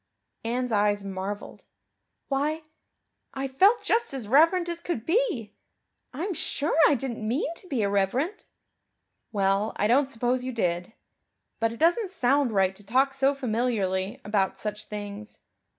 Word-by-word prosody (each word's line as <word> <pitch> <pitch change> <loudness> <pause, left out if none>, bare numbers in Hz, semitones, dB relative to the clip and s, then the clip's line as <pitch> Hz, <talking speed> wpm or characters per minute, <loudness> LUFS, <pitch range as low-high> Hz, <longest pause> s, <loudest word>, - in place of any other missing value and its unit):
Anne's 245 +2 -1
eyes 205 -1 +2
marveled. 195 +2 -6 0.6
"Why, 300 +3 -1 0.7
I 270 0 -2
felt 385 - +4
just 455 -11 +1
as 245 -6 -4
reverent 330 - +4
as 340 -1 -4
could 295 -10 -3
be. 330 - 0 0.6
I'm 345 +9 -3
sure 300 -1 -1
I 295 - +4
didn't 235 -4 -4
mean 270 +7 -1
to 370 - -7
be 260 -9 -1
irreverent." 200 - 0 0.8
"Well 200 +1 +1
I 205 - 0
don't 260 +5 +3
suppose 250 0 -1
you 255 0 -4
did 180 -2 -1 0.7
but 225 0 +1
it 230 - -8
doesn't 350 +6 +3
sound 280 -6 +2
right 190 -2 +2
to 205 - -12
talk 260 +6 +2
so 270 +1 +2
familiarly 215 -7 -1
about 195 -2 0
such 210 +1 -4
things. 210 0 -7
245 Hz, 145 wpm, -26 LUFS, 205-285 Hz, 0.8 s, felt